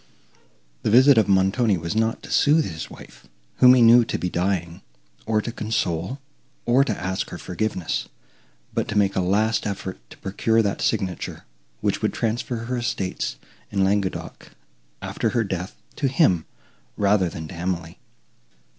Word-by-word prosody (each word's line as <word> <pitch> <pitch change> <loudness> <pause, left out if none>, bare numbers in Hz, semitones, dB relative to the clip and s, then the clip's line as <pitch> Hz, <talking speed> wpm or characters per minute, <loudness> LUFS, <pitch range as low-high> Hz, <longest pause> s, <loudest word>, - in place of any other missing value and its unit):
The - - 0
visit 130 +3 +7
of 110 - +2
Montoni 95 +2 +3
was 85 +4 -4
not 110 +1 0
to - - -9
sooth 155 +2 +4
his 80 -4 -6
wife, - - -14 0.3
whom 125 0 +8
he 125 - +5
knew 120 +1 +8
to - - -2
be 90 - -3
dying, 90 -1 -1 0.5
or 110 -1 +1
to 120 - -4
console, 110 - -2 0.5
or 125 +3 +4
to 140 - -2
ask 95 0 -3
her - - -7
forgiveness, 90 -2 -3 0.6
but - - -1
to 105 - -2
make 100 -1 +2
a 95 - +2
last 105 +5 +1
effort 95 -2 -5
to - - -13
procure 110 +3 +1
that 100 -1 -2
signature, 95 -5 -2 0.4
which - - 0
would - - 0
transfer 115 +1 -2
her 125 +1 -2
estates 95 - -2 0.3
in 100 -1 +1
Languedoc, 95 -1 -2 0.5
after - - -1
her 115 - +1
death, 95 -2 -4 0.2
to 140 - +1
him 130 - +3 0.5
rather 100 -3 +3
than 80 -1 -7
to - - -8
Emily. 85 -1 -4
100 Hz, 160 wpm, -23 LUFS, 95-115 Hz, 0.6 s, whom